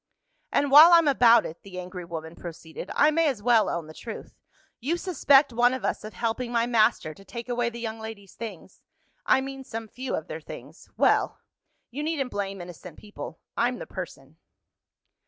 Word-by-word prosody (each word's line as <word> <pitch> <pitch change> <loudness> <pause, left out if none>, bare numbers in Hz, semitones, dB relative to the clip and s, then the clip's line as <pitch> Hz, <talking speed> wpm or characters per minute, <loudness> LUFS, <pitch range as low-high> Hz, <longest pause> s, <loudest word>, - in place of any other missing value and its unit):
"And 285 -1 +1
while 310 +5 +10
I'm 335 -2 +6
about 235 -4 +6
it," 160 - -8
the 185 -2 -9
angry 180 0 -7
woman 160 -1 -7
proceeded, 165 -2 -9
"I 300 +1 +5
may 325 +1 +2
as 245 -8 -2
well 235 -2 +4
own 170 -2 -3
the 155 - -11
truth. 225 +6 -9 0.5
You 310 +8 -1
suspect 285 -7 +3
one 245 +2 +3
of 260 - -5
us - - -2
of 215 0 -8
helping 235 +4 -2
my 235 -1 +2
master 215 -9 +2
to 195 - -16
take 235 +5 -8
away 240 -1 0
the 235 0 -9
young 225 -1 -5
ladies' 220 -3 -9
things 205 -5 -9 0.5
I 265 - +4
mean 270 0 -6
some 225 -3 -6
few 255 +4 -4
of 155 - -5
their 160 - -6
things. - - -11
Well! - - +2 0.5
you 275 +5 -5
needn't 300 -4 -2
blame 195 -2 -4
innocent 175 -1 -10
people. 165 -7 -9
I'm 245 +1 +1
the - - -7
person." 155 -5 -9
230 Hz, 190 wpm, -26 LUFS, 185-260 Hz, 0.5 s, while